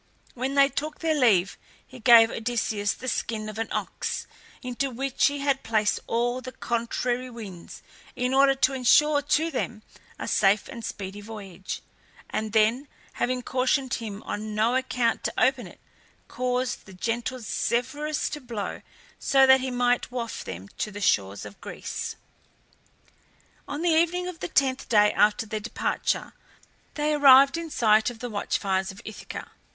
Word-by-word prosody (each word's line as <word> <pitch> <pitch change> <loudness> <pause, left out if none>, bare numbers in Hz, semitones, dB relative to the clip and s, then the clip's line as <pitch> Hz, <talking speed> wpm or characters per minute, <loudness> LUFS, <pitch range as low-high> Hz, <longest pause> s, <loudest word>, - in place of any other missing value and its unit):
When 260 +3 -3
they 275 0 +6
took 300 +2 -4
their 325 -1 +2
leave 215 - +3 0.3
he 255 - -13
gave 225 -1 +7
Odysseus 220 -3 -1
the 255 - -9
skin 220 -2 -2
of 215 +1 -7
an 225 - -1
ox, - - -3 0.4
into 255 +2 -2
which 265 +1 +1
he 285 0 -2
had 275 -1 +1
placed 215 -2 +1
all 245 +2 0
the 255 0 -7
contrary 240 +2 -2
winds 205 -8 -10 0.3
in 250 +1 -1
order 275 0 +5
to 270 0 +2
insure 290 +3 +4
to 300 +3 +1
them 220 -7 -3 0.3
a - - -5
safe 195 +1 +3
and 230 - -8
speedy 200 -2 -6
voyage, 200 -4 -7 0.5
and 215 0 -2
then, 225 +6 +2 0.3
having 250 0 -1
cautioned 260 +1 0
him 215 -3 -5
on 215 0 -5
no 220 +3 +2
account 250 -3 0
to - - -1
open 260 -1 +2
it, - - -15 0.5
caused 250 -1 -2
the 190 - -12
gentle 235 +6 -2
Zephyrus 260 +6 -1
to 295 - -6
blow 230 -5 -5 0.4
so 270 -1 +4
that 265 0 +6
he 260 - -2
might 245 0 +1
waft 240 -2 -5
them 95 +1 -7
to - - -1
the 205 0 -8
shores 100 - +1
of 200 - -12
Greece. - - -5 1.5
On 290 +3 -4
the 350 - +3
evening 345 +2 +2
of 360 -3 -7
the - - -3
tenth 265 -4 +1
day 210 -2 +5
after 215 +2 +3
their 215 0 -4
departure 220 +3 -2 0.6
they 300 0 0
arrived 275 -1 +7
in 335 -1 -4
sight 220 -5 +3
of 240 - -9
the 245 +1 -6
watch 205 - -1
fires 190 -1 -1
of 190 - -13
Ithaca. 215 - -8
245 Hz, 165 wpm, -26 LUFS, 215-270 Hz, 1.5 s, gave